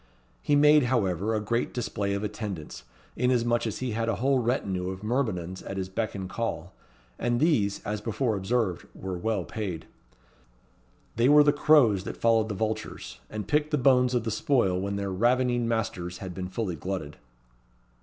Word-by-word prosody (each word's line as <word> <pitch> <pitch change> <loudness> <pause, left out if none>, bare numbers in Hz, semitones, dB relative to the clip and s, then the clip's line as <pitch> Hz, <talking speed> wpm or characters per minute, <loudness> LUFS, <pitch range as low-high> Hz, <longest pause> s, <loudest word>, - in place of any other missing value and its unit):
He 145 - +2
made, 150 -1 +6
however, 110 -4 0
a - - +1
great 115 +3 -2
display 100 -5 -2
of 100 - -3
attendants, 100 - -6 0.3
inasmuch 120 -2 +1
as 110 - -3
he 130 -2 -2
had 115 +1 -1
a 115 - +1
whole 135 +3 +2
retinue 100 -7 -1
of 95 +1 -7
myrmidons 105 -7 -2
at 95 - -6
his 95 -1 -3
beck 110 +3 -3
and 95 -1 -4
call; 95 -4 -4 0.5
and 120 0 0
these, 120 -11 +1
as 105 0 -3
before 115 +1 -1
observed, 100 -2 -1
were 95 -1 -5
well 100 +1 -1
paid. 95 -5 -5 1.3
They 120 +3 +4
were 150 0 +8
the 145 -1 +4
crows 140 -10 +4
that - - -5
followed 115 -1 +2
the 105 - -3
vultures, 110 +2 -4
and 105 -2 -5
picked 150 +4 +1
the 150 - +1
bones 125 -1 +4
of 120 - +1
the 115 - -2
spoil 110 - +1
when 100 +1 -2
their 100 -1 -3
ravening 120 +3 +2
masters 105 -6 -2
had 95 -2 -7
been 90 0 -5
fully 95 -2 -3
glutted. 90 -3 -5
110 Hz, 175 wpm, -27 LUFS, 95-125 Hz, 1.3 s, were